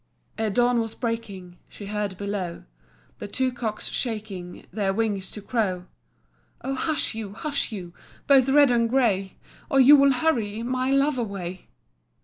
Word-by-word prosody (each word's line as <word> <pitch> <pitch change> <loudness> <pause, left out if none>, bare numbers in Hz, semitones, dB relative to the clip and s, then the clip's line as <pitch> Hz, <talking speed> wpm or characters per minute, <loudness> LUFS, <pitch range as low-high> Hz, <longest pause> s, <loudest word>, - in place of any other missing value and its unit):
Ere 220 -1 +1
dawn 245 +3 +3
was 225 -1 -3
breaking 205 -7 -5
She 205 - -10
heard 205 -2 -3
below 200 -4 -4 0.6
The - - -5
two 260 +5 0
cocks 230 -3 -4
shaking 205 -7 -5
Their 195 -3 0
wings 205 -4 -1
to 210 - -7
crow. 190 -7 -1 0.8
"Oh, 270 - -2
hush 310 +2 0
you, 215 -3 -6
hush 285 +2 -2
you, 180 -5 -7 0.3
Both 270 -2 +5
red 285 -1 +6
and 235 -1 +2
grey, 205 -7 +1 0.3
Or 270 - +3
you 270 +3 +9
will 275 -1 +5
hurry 230 -7 0
My 255 +1 -1
love 275 0 +2
away. 190 -5 -5
225 Hz, 150 wpm, -25 LUFS, 200-255 Hz, 0.8 s, you